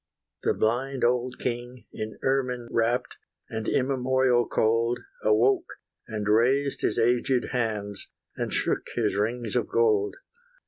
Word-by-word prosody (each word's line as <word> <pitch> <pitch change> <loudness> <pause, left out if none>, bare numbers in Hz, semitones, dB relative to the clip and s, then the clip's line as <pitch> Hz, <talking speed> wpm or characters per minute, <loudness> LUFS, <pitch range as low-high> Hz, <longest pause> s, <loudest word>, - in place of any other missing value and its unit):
The - - +1
blind 130 +4 0
old 125 +1 +1
king, 120 0 -4
in 110 0 -5
ermine 125 -3 0
wrapt. 120 +2 0 0.3
And 110 -1 -3
immemorial 130 -2 +2
cold, 115 +2 +2 0.3
Awoke, 115 +5 +3 0.4
and 105 -2 -4
raised 130 +6 +2
his - - 0
aged 120 +2 +2
hands, 105 -4 -2 0.3
And - - -3
shook - - 0
his 110 -4 +1
rings 115 +2 -1
of - - +1
gold. 420 0 +2
120 Hz, 125 wpm, -26 LUFS, 115-130 Hz, 0.4 s, Awoke